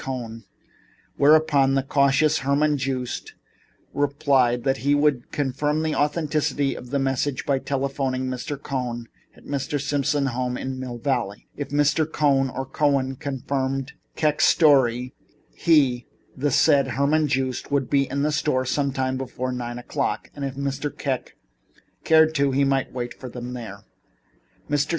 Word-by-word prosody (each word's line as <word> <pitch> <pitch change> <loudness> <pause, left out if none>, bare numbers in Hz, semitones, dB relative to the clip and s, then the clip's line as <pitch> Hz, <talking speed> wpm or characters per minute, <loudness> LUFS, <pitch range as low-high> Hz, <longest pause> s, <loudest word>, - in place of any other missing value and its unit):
Cohn, 115 -4 -6 0.7
whereupon 145 -2 +4
the 135 - +1
cautious 140 +2 +3
Herman 145 +2 +2
Joost 130 -2 -3 0.6
replied 135 -4 +2
that 135 0 +1
he 140 +2 +2
would 145 -4 +1
confirm 145 +2 -1
the 160 -1 0
authenticity 150 -2 0
of 125 - -9
the 140 - 0
message 135 0 -1
by 140 -2 +1
telephoning 135 -1 -2
to - - -2
Mr. 135 +3 -5
Cohn 125 -4 -4 0.3
at - - -18
Mr. 140 +1 -2
Simon's 140 -1 0
home 125 0 -2
in 130 0 -4
Mill 125 -2 -5
Valley. 120 -5 -2
If 145 -1 -5
Mr. 145 +2 +2
B. 160 - -22
Cohn 135 -3 +2
or 135 +1 -4
Cohen 135 -1 0
confirmed 135 0 -3
Mr. - - -24 0.2
Kek's 150 -1 +2
story 130 -5 +4 0.4
he, 135 -7 +2 0.3
the 145 +3 0
said 140 +1 +4
Herman 150 +2 +2
Joost, 130 -2 -2
would 140 -3 0
be 140 -1 +2
at 140 +1 -1
the 150 - +1
store 150 -4 0
sometime 130 -1 -1
before 130 -1 -4
nine 120 -1 -4
o'clock, 120 - -3
and 145 - -6
if 135 -1 -3
Mr. 140 +1 -2
Kek 135 -3 -4 0.7
cared 160 0 +5
to, 140 -2 +2
he 135 +1 +2
might 135 -1 +1
await 120 -1 -6
him 125 0 -6
there. 110 -5 -7 0.9
Mr. 145 +1 0
135 Hz, 155 wpm, -24 LUFS, 130-145 Hz, 0.9 s, cared